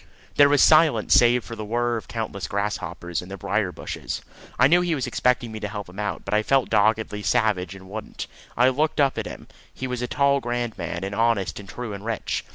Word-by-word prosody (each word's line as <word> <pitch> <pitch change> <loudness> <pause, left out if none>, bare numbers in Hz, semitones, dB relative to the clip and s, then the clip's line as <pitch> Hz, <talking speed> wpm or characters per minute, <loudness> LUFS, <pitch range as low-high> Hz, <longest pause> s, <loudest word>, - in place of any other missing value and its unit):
There 145 0 +7
was 145 0 +5
silence 155 -8 +5
save 120 0 +5
for 115 +5 -8
the 110 - -6
whirr 120 +2 0
of 115 - -6
the - - -12
countless 105 -6 -3
grasshoppers 90 -4 -3
in 90 - -11
the 100 - -6
brier 100 -2 -1
bushes. - - -6 0.3
I 125 - +6
knew 175 +6 +5
he 175 -2 0
was 135 - -2
expecting 125 -2 +1
me 110 - -6
to 105 - -3
help 105 -1 -6
him 90 +3 -11
out, 105 - -3
but 100 - -3
I 105 - +4
felt 135 +3 +1
doggedly 110 0 +2
savage 100 -3 +1
and 95 -1 -12
wouldn't. 105 +3 -6 0.3
I 125 +2 +5
looked 150 +4 0
up 140 -2 +3
at - - -4
him. - - -9 0.2
He 130 - -6
was 125 -1 -3
a 125 - -1
tall 140 +2 +2
grand 120 -2 -3
man, 85 +1 -4
and 100 +1 -4
honest 115 -3 +1
and 100 -2 -11
true 120 -4 -6
and 100 0 -7
rich. 115 -1 -2
110 Hz, 235 wpm, -24 LUFS, 100-125 Hz, 0.3 s, There